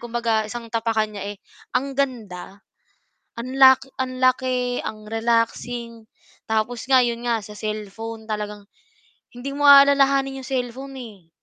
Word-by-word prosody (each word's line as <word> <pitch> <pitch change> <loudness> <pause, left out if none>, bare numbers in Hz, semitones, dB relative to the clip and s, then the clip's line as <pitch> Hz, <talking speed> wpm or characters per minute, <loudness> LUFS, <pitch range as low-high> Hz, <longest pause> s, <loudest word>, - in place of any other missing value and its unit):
kumbaga 230 -2 -1
isang 230 0 -8
tapakan 225 -2 0
niya 205 0 -6 0.4
ang 275 +1 -2
ganda 215 -8 -4 0.7
ang 255 +3 -6
la 265 0 +9 0.2
ang 255 -1 -3
laki, 255 -1 +1
ang 215 -1 -6
relaxing, 230 +1 -1 0.4
tapos 220 +2 -1
nga 265 -1 +6
'yon 235 0 -2
nga 230 -1 +1
sa 210 0 -11
cellphone 215 +1 -5
talagang 210 -1 -4 0.7
hindi 260 +3 -6
mo 290 - -2
aalalahanin 275 -1 +6
'yong - - -9
cellphone, 260 +2 -4
eh. 205 -8 -12
235 Hz, 130 wpm, -22 LUFS, 215-255 Hz, 0.7 s, la